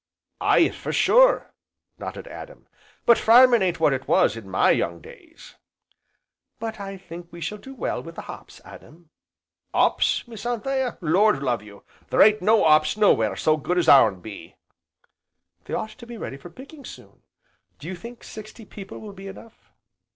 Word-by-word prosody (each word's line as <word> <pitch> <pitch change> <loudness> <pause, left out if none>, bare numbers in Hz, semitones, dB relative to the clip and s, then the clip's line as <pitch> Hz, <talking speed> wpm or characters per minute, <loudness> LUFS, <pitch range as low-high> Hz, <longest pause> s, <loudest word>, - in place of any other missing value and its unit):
"Aye, - - +4
for - - -6
sure!" - - +3 0.5
nodded - - -7
Adam, - - -11 0.4
"but 235 - +5
farmin' 240 0 +6
ain't 175 -2 0
what 155 -3 +3
it 130 0 -5
was - - +3
in 110 -4 -10
my 95 - +3
young 85 0 -1
days!" 75 - -16 1.0
"But 225 -1 -6
I 195 -1 -7
think 175 -2 -11
we 170 - -11
shall 210 +5 -5
do 270 +4 -12
well - - -3
with 165 0 -11
the - - -8
hops, - - -11
Adam." 165 +1 -15 0.6
"'Ops, - - +1
Miss 225 -3 -10
Anthea, 245 +2 -2
lord 180 0 +2
love 120 -5 -1
you! 105 -1 -15 0.3
there - - +5
ain't 215 0 +4
no 215 +2 +3
'ops 155 +4 +4
nowhere 110 - +3
so 155 +9 +1
good 180 +4 -2
as 175 - +1
ourn 110 -9 +6
be!" 105 0 -11 1.1
"They - - -4
ought 215 - -4
to 235 +1 -14
be 240 -1 -9
ready 135 - -7
for 155 +6 -12
picking, 275 - -13
soon, - - -13 0.6
do 150 - -11
you 185 - -5
think 235 +7 -11
sixty 215 +1 -11
people 195 -1 -10
will 210 -2 -10
be 195 0 -11
enough?" 215 +3 -14
195 Hz, 175 wpm, -23 LUFS, 155-230 Hz, 1.1 s, farmin